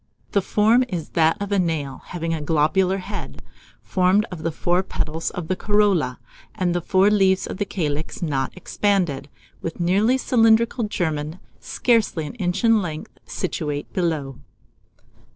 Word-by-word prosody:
The 200 Hz, -, +2 dB
form 220 Hz, +6 st, +3 dB
is 175 Hz, -8 st, -4 dB
that 165 Hz, +3 st, +2 dB
of 205 Hz, 0 st, -4 dB
a 200 Hz, -, +2 dB
nail, 155 Hz, -6 st, -2 dB
having 165 Hz, -2 st, -3 dB
a 160 Hz, -, -2 dB
globular 165 Hz, +6 st, +2 dB
head, 185 Hz, -, -7 dB, 0.4 s
formed 190 Hz, +3 st, +2 dB
of 175 Hz, -3 st, -6 dB
the 165 Hz, -, -1 dB
four 175 Hz, +3 st, +1 dB
petals 160 Hz, -3 st, -3 dB
of 175 Hz, -3 st, -6 dB
the 185 Hz, -, 0 dB
corolla, 195 Hz, -11 st, +2 dB, 0.4 s
and 175 Hz, -2 st, 0 dB
four 195 Hz, +3 st, +3 dB
leaves 190 Hz, -2 st, +3 dB
of -, -, -6 dB
the 205 Hz, -, -1 dB
calyx 155 Hz, -6 st, -3 dB
not 140 Hz, -6 st, -1 dB
expanded, 180 Hz, -7 st, 0 dB, 0.3 s
with 165 Hz, -, -4 dB
a -, -, 0 dB
nearly 205 Hz, +9 st, +3 dB
cylindrical 230 Hz, -1 st, +3 dB
germen, 160 Hz, -5 st, -2 dB, 0.2 s
scarcely 225 Hz, -10 st, +1 dB
an -, -, -7 dB
inch 180 Hz, +3 st, -1 dB
in 225 Hz, -2 st, +5 dB
length, 155 Hz, -4 st, -7 dB
situate 150 Hz, -5 st, -3 dB
below. 155 Hz, -7 st, -2 dB
180 Hz, 150 wpm, -22 LUFS, 160-205 Hz, 0.4 s, in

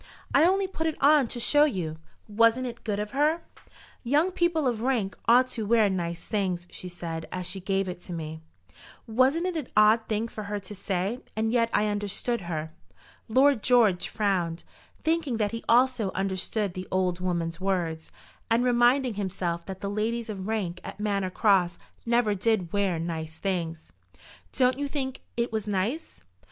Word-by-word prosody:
"I 315 Hz, -, +6 dB
only 385 Hz, +2 st, +3 dB
put 325 Hz, -4 st, -3 dB
it 315 Hz, -, -2 dB
on 285 Hz, -2 st, +5 dB
to 240 Hz, -, -5 dB
show 290 Hz, +5 st, +4 dB
you. 170 Hz, -, -3 dB, 0.3 s
Wasn't 230 Hz, +4 st, +3 dB
it 235 Hz, -1 st, -7 dB
good 205 Hz, -2 st, -2 dB
of 210 Hz, 0 st, -3 dB
her? 305 Hz, +5 st, +1 dB, 0.6 s
'Young 295 Hz, +9 st, +2 dB
people 345 Hz, -4 st, +1 dB
of 235 Hz, -3 st, -1 dB
rank 235 Hz, -6 st, 0 dB
ought 250 Hz, +2 st, +6 dB
to 230 Hz, -3 st, -4 dB
wear 220 Hz, -3 st, +4 dB
nice 170 Hz, -2 st, -3 dB
things,' 185 Hz, -5 st, -1 dB
she 180 Hz, -, -7 dB
said, 165 Hz, -2 st, -6 dB
as 185 Hz, -1 st, -4 dB
she 195 Hz, -, -3 dB
gave 195 Hz, +1 st, -1 dB
it 180 Hz, 0 st, -7 dB
me. 160 Hz, -2 st, -5 dB, 0.6 s
Wasn't 260 Hz, +9 st, +2 dB
it 365 Hz, -2 st, -2 dB
an 300 Hz, -6 st, -3 dB
odd 215 Hz, +2 st, +5 dB
thing 220 Hz, +1 st, -1 dB
for 215 Hz, -2 st, -7 dB
her 205 Hz, 0 st, -3 dB
to 200 Hz, +1 st, -9 dB
say? 195 Hz, +3 st, -2 dB, 0.2 s
and 220 Hz, +1 st, 0 dB
yet 230 Hz, -1 st, +3 dB
I 210 Hz, -, +2 dB
understood 205 Hz, +3 st, -1 dB
her." 160 Hz, -2 st, -4 dB, 0.5 s
Lord 265 Hz, +1 st, +4 dB
George 225 Hz, -8 st, +3 dB
frowned, 180 Hz, -6 st, -1 dB, 0.4 s
thinking 315 Hz, -6 st, 0 dB
that 210 Hz, -2 st, 0 dB
he 230 Hz, 0 st, -5 dB
also 245 Hz, -3 st, +4 dB
understood 195 Hz, +1 st, -1 dB
the 185 Hz, +1 st, -6 dB
old 185 Hz, -1 st, 0 dB
woman's 170 Hz, -2 st, -2 dB
words, 170 Hz, -4 st, -2 dB, 0.4 s
and 230 Hz, +2 st, +3 dB
reminding 245 Hz, +1 st, +3 dB
himself 180 Hz, -4 st, -3 dB
that 190 Hz, -1 st, -7 dB
the 200 Hz, -, -3 dB
ladies 220 Hz, +3 st, -2 dB
of 195 Hz, -2 st, -6 dB
rank 190 Hz, -6 st, -2 dB
at -, -, -8 dB
Manor 200 Hz, -3 st, 0 dB
Cross 185 Hz, -3 st, +2 dB, 0.3 s
never 235 Hz, -2 st, +3 dB
did 200 Hz, -3 st, 0 dB
wear 200 Hz, -4 st, +1 dB
nice 160 Hz, -1 st, -4 dB
things. 165 Hz, -, -3 dB, 0.6 s
"Don't 255 Hz, 0 st, +2 dB
you 285 Hz, -, -1 dB
think 265 Hz, -2 st, -4 dB, 0.2 s
it 235 Hz, 0 st, 0 dB
was 215 Hz, -1 st, -2 dB
nice?" 205 Hz, -, -2 dB
210 Hz, 175 wpm, -27 LUFS, 185-245 Hz, 0.6 s, I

